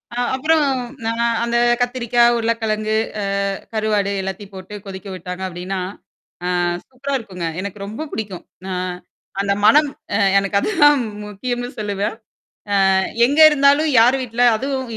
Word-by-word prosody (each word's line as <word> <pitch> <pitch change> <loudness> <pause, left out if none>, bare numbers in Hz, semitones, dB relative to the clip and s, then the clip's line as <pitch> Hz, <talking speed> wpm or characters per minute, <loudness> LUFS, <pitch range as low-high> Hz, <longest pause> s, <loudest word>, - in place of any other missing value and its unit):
அ - - -6 0.2
அப்புறம் 310 +3 +2 0.5
அ - - +1 0.3
அந்த 235 0 0 0.2
கத்திரிக்காய், 240 -1 +2
உருளைக்கிழங்கு, 220 -2 -1 0.3
அ - - -2 0.5
கருவாடு 210 -2 0
எல்லாத்தையும் 195 +1 -6
போட்டு 190 +2 -9
கொதிக்க 195 +1 -8
விட்டாங்க 180 +1 -7
அப்டின்னா, 185 +2 -5 0.7
ஆ - - 0 0.4
சூப்பரா 275 +2 -4
இருக்குங்க. 185 -6 -7 0.2
எனக்கு 200 +1 -6
ரொம்ப 220 +9 -6
பிடிக்கும். 200 -5 -5 0.2
நான் 180 -1 -3 0.5
அந்த 200 0 +1
மனம் 295 +5 +6 0.3
அ - - +3 0.2
எனக்கு 200 0 -1
அதுதான் 295 - +4 0.3
முக்கியம்னு 245 +4 -4
சொல்லுவேன். 205 -1 -2 0.8
அ - - +4 0.3
எங்க 285 +4 -1
இருந்தாலும், 285 +2 +4
யார் 250 +4 +5
வீட்ல 240 0 -2
அதுவும் 265 0 -3
220 Hz, 130 wpm, -20 LUFS, 200-255 Hz, 0.8 s, மனம்